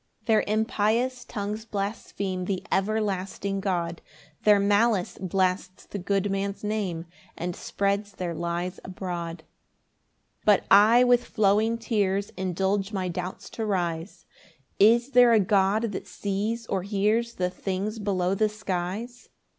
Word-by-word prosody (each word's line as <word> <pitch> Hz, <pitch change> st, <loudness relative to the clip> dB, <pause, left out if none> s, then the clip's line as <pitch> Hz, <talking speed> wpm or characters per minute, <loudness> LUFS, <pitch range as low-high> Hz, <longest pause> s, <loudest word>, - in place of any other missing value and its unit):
5 -, -, -36 dB
Their 220 Hz, -2 st, +3 dB
impious 220 Hz, +3 st, +1 dB
tongues 210 Hz, -1 st, -4 dB
blaspheme 200 Hz, -3 st, -3 dB
The 190 Hz, -1 st, -2 dB
everlasting 195 Hz, -1 st, -1 dB
God; 175 Hz, -4 st, -2 dB, 0.4 s
Their 210 Hz, -1 st, +6 dB
malice 205 Hz, -1 st, +2 dB
blasts 185 Hz, 0 st, -1 dB
the 200 Hz, -, -6 dB
good 195 Hz, +1 st, 0 dB
man's 195 Hz, +1 st, -2 dB
name, 200 Hz, -6 st, -2 dB, 0.3 s
And 175 Hz, 0 st, -3 dB
spreads 200 Hz, +1 st, -1 dB
their 180 Hz, -3 st, -4 dB
lies 170 Hz, +2 st, -3 dB
abroad. 175 Hz, -2 st, -5 dB, 1.0 s
6 -, -, -42 dB
But 205 Hz, -3 st, +4 dB
I 220 Hz, +5 st, +7 dB
with 245 Hz, -1 st, +4 dB
flowing 215 Hz, +2 st, +2 dB
tears 205 Hz, -3 st, 0 dB
Indulge 190 Hz, +2 st, -1 dB
my 190 Hz, -3 st, -2 dB
doubts 180 Hz, +1 st, -5 dB
to 225 Hz, -, -4 dB
rise 175 Hz, -4 st, -2 dB, 0.5 s
"Is 235 Hz, +5 st, +5 dB
there 245 Hz, -2 st, +6 dB
a 225 Hz, -, +6 dB
God 200 Hz, +3 st, +2 dB
that 200 Hz, -, -6 dB
sees 205 Hz, +5 st, -2 dB
or 195 Hz, -3 st, -1 dB
hears 215 Hz, +4 st, 0 dB
"The 180 Hz, 0 st, -1 dB
things 195 Hz, +4 st, -3 dB
below 190 Hz, -3 st, 0 dB
the 215 Hz, +2 st, +2 dB
skies?" 210 Hz, +4 st, -4 dB
200 Hz, 135 wpm, -26 LUFS, 185-215 Hz, 1.0 s, I